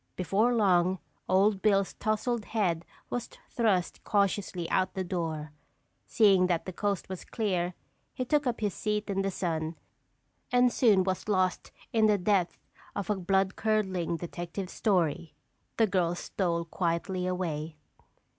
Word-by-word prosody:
Before 200 Hz, +6 st, +2 dB
long, 185 Hz, -4 st, +3 dB, 0.3 s
Old 195 Hz, +1 st, +3 dB
Bill's 200 Hz, -2 st, +2 dB
tousled 215 Hz, +1 st, -1 dB
head 175 Hz, -7 st, 0 dB, 0.3 s
was 245 Hz, -1 st, -3 dB, 0.2 s
thrust 205 Hz, -7 st, 0 dB
cautiously 195 Hz, -4 st, 0 dB
out 185 Hz, 0 st, +1 dB
the 190 Hz, -, -1 dB
door. 160 Hz, -4 st, -3 dB, 0.6 s
Seeing 195 Hz, -4 st, +5 dB
that 175 Hz, -2 st, 0 dB
the 185 Hz, -, -5 dB
coast 200 Hz, 0 st, -1 dB
was 185 Hz, -1 st, -6 dB
clear 180 Hz, -6 st, -1 dB, 0.4 s
he 255 Hz, -, -3 dB
took 295 Hz, +1 st, +1 dB
up 235 Hz, -2 st, -1 dB
his 205 Hz, -3 st, 0 dB
seat 210 Hz, -1 st, -2 dB
in 195 Hz, 0 st, 0 dB
the 195 Hz, -, 0 dB
sun 165 Hz, -3 st, -2 dB, 0.8 s
and 245 Hz, 0 st, +4 dB
soon 210 Hz, -7 st, +4 dB
was 190 Hz, +2 st, -2 dB
lost 185 Hz, -2 st, +1 dB, 0.2 s
in 220 Hz, -1 st, +4 dB
the 210 Hz, -1 st, +4 dB
depth 185 Hz, -2 st, +1 dB, 0.4 s
of 200 Hz, +1 st, -2 dB
a -, -, +2 dB
bloodcurdling 190 Hz, -1 st, 0 dB
detective 175 Hz, +2 st, -5 dB
story. 170 Hz, -6 st, 0 dB, 0.4 s
The 225 Hz, -, +5 dB
girls 180 Hz, -3 st, 0 dB
stole 170 Hz, -3 st, -1 dB
quietly 180 Hz, +2 st, -1 dB
away. 165 Hz, -4 st, -3 dB
190 Hz, 140 wpm, -29 LUFS, 175-210 Hz, 0.8 s, Seeing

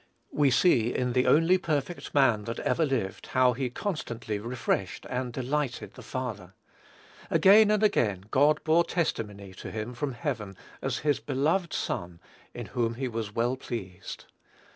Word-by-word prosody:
We 145 Hz, -2 st, +3 dB
see 125 Hz, -4 st, +3 dB
in 125 Hz, -1 st, 0 dB
the 125 Hz, 0 st, +2 dB
only 165 Hz, +7 st, +5 dB
perfect 155 Hz, -1 st, -3 dB
man 120 Hz, -7 st, +4 dB
that 115 Hz, -, -4 dB
ever 160 Hz, -2 st, +1 dB
lived 115 Hz, -8 st, -2 dB
how 130 Hz, -1 st, +3 dB
he 130 Hz, +1 st, -2 dB
constantly 120 Hz, -, -4 dB
refreshed 115 Hz, -5 st, -2 dB
and 125 Hz, 0 st, -2 dB
delighted 130 Hz, +1 st, -2 dB
the -, -, -11 dB
Father. 105 Hz, -8 st, -5 dB, 0.7 s
Again 205 Hz, +2 st, +6 dB
and 215 Hz, 0 st, +2 dB
again 105 Hz, -, +2 dB
God 150 Hz, +3 st, +3 dB
bore 165 Hz, +2 st, +4 dB
testimony 105 Hz, -, -3 dB
to -, -, -8 dB
him 110 Hz, +3 st, -5 dB
from 135 Hz, +2 st, -3 dB
heaven, 115 Hz, -, -4 dB, 0.2 s
as -, -, -1 dB
his 145 Hz, -1 st, +2 dB
"beloved 155 Hz, +6 st, 0 dB
Son, 85 Hz, -1 st, -3 dB, 0.3 s
in -, -, -7 dB
whom 115 Hz, -1 st, -1 dB
he 130 Hz, +2 st, -2 dB
was 110 Hz, -3 st, -4 dB
well 120 Hz, +2 st, +1 dB
pleased." 100 Hz, -8 st, -7 dB
125 Hz, 155 wpm, -28 LUFS, 115-150 Hz, 0.7 s, Again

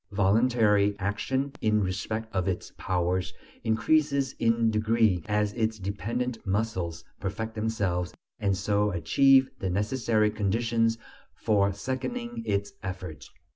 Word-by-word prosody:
Voluntary 105 Hz, 0 st, +3 dB
action, 130 Hz, +8 st, -1 dB
in 110 Hz, -1 st, +3 dB
respect 110 Hz, +4 st, -3 dB
of 95 Hz, -1 st, 0 dB
its 95 Hz, -2 st, -3 dB
"powers," 90 Hz, 0 st, -1 dB, 0.3 s
increases 140 Hz, +4 st, +2 dB
in 115 Hz, 0 st, +3 dB
degree 110 Hz, -3 st, +2 dB
as 105 Hz, 0 st, +1 dB
its 110 Hz, -2 st, -1 dB
dependent 115 Hz, +5 st, -3 dB
muscles 95 Hz, -5 st, -2 dB, 0.2 s
perfect 110 Hz, +3 st, -4 dB
themselves 100 Hz, -6 st, -1 dB, 0.3 s
and 100 Hz, -2 st, +1 dB
so 105 Hz, +1 st, +1 dB
achieve 130 Hz, -, +4 dB
the 95 Hz, -, -2 dB
necessary 110 Hz, +2 st, +1 dB
conditions 115 Hz, +2 st, +1 dB, 0.4 s
for 100 Hz, -2 st, +2 dB
seconding 230 Hz, -, -4 dB
its 100 Hz, 0 st, -1 dB
efforts. 90 Hz, -6 st, -7 dB
105 Hz, 115 wpm, -28 LUFS, 100-115 Hz, 0.4 s, achieve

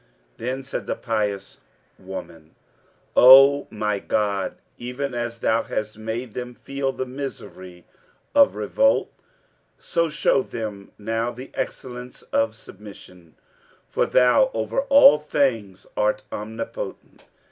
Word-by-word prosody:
Then 130 Hz, +3 st, -4 dB
said 135 Hz, -, -5 dB
the -, -, -1 dB
pious 105 Hz, -4 st, -3 dB, 0.4 s
woman, 85 Hz, -4 st, -9 dB, 0.6 s
"O 135 Hz, +3 st, +8 dB
my 105 Hz, -1 st, -2 dB
God, 100 Hz, -2 st, -1 dB, 0.2 s
even 125 Hz, +3 st, -4 dB
as 120 Hz, -1 st, -3 dB
Thou 115 Hz, +1 st, +2 dB
hast 110 Hz, 0 st, -4 dB
made 110 Hz, +2 st, -5 dB
them 125 Hz, -1 st, -6 dB
feel 135 Hz, +1 st, -3 dB
the 130 Hz, -, -4 dB
misery 110 Hz, -9 st, -8 dB, 0.5 s
of 285 Hz, -1 st, +5 dB
revolt, -, -, +1 dB, 0.6 s
so 170 Hz, -1 st, -1 dB
show 150 Hz, -2 st, +2 dB
them 105 Hz, -6 st, -7 dB
now 115 Hz, +2 st, -2 dB
the 125 Hz, +2 st, -10 dB
excellence 125 Hz, -1 st, -6 dB
of 115 Hz, 0 st, +1 dB
submission, 90 Hz, -6 st, -14 dB, 0.5 s
for -, -, 0 dB
Thou 125 Hz, -3 st, +4 dB
over 110 Hz, -, -1 dB
all 275 Hz, -, +8 dB
things 120 Hz, -10 st, -1 dB
art 105 Hz, 0 st, 0 dB
Omnipotent!" 110 Hz, -, -7 dB
115 Hz, 115 wpm, -23 LUFS, 105-135 Hz, 0.6 s, O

